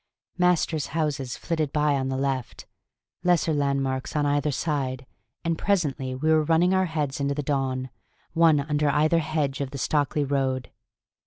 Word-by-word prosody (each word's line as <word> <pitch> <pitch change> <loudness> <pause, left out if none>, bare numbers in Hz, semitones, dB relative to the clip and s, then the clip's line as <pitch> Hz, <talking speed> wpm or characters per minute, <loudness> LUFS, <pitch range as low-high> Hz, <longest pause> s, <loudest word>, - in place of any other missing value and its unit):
Masters' 170 -4 +2
houses 145 -5 -1
flitted 155 -4 -2
by 150 -1 +2
on 135 -1 -1
the 130 - -2
left, 135 -3 -3 0.6
lesser 175 -3 +3
landmarks 135 -2 -1
on 150 -1 +2
either 145 +1 +1
side, 130 -3 -2 0.4
and 165 -1 -1
presently 140 -9 0
we 155 +5 +1
were 155 0 +5
running 165 +4 +3
our 190 0 +3
heads 150 -3 -2
into 140 0 0
the 150 - -2
dawn, 130 -2 -1 0.4
one 165 -3 +5
under 150 0 0
either 155 +3 +3
hedge 145 -3 -1
of 140 - -2
the 140 - -7
Stockley 145 +1 0
road. 135 -2 -1
145 Hz, 160 wpm, -25 LUFS, 135-155 Hz, 0.6 s, were